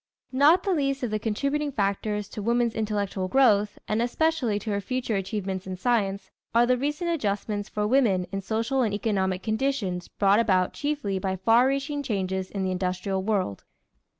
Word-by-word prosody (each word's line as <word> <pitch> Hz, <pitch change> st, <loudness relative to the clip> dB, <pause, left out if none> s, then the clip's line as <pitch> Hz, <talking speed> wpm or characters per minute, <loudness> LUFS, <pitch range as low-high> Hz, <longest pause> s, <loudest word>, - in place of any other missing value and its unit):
Not 295 Hz, +7 st, +5 dB
the 390 Hz, -, +1 dB
least 275 Hz, -4 st, 0 dB
of 240 Hz, -, -1 dB
the 215 Hz, -, 0 dB
contributing 280 Hz, +7 st, -1 dB
factors 210 Hz, -2 st, -1 dB
to 210 Hz, -, -6 dB
woman's 235 Hz, +1 st, +1 dB
intellectual 205 Hz, -3 st, -2 dB
growth, 210 Hz, -4 st, +3 dB
and 215 Hz, +2 st, 0 dB
especially 250 Hz, -2 st, +1 dB
to 210 Hz, +1 st, -4 dB
her 200 Hz, 0 st, -1 dB
future 250 Hz, +1 st, -2 dB
achievements 190 Hz, -1 st, -3 dB
in 185 Hz, -, -4 dB
science, 200 Hz, -3 st, 0 dB, 0.2 s
are 235 Hz, +1 st, +6 dB
the 255 Hz, +1 st, +3 dB
recent 295 Hz, +7 st, -1 dB
adjustments 205 Hz, -7 st, -2 dB
for 210 Hz, 0 st, -1 dB
women 210 Hz, -7 st, +3 dB
in 195 Hz, 0 st, -3 dB
social 225 Hz, +6 st, 0 dB
and 215 Hz, -4 st, +1 dB
economical 190 Hz, -3 st, -1 dB
conditions 220 Hz, -6 st, -1 dB
brought 200 Hz, +1 st, +3 dB
about 185 Hz, -5 st, +2 dB
chiefly 285 Hz, -10 st, -2 dB
by 190 Hz, 0 st, -1 dB
far 225 Hz, +6 st, +4 dB
reaching 280 Hz, +2 st, -1 dB
changes 190 Hz, -6 st, -2 dB
in 195 Hz, -2 st, -3 dB
the 185 Hz, -, 0 dB
industrial 185 Hz, +1 st, -1 dB
world. 190 Hz, -, -1 dB
215 Hz, 175 wpm, -26 LUFS, 195-255 Hz, 0.2 s, are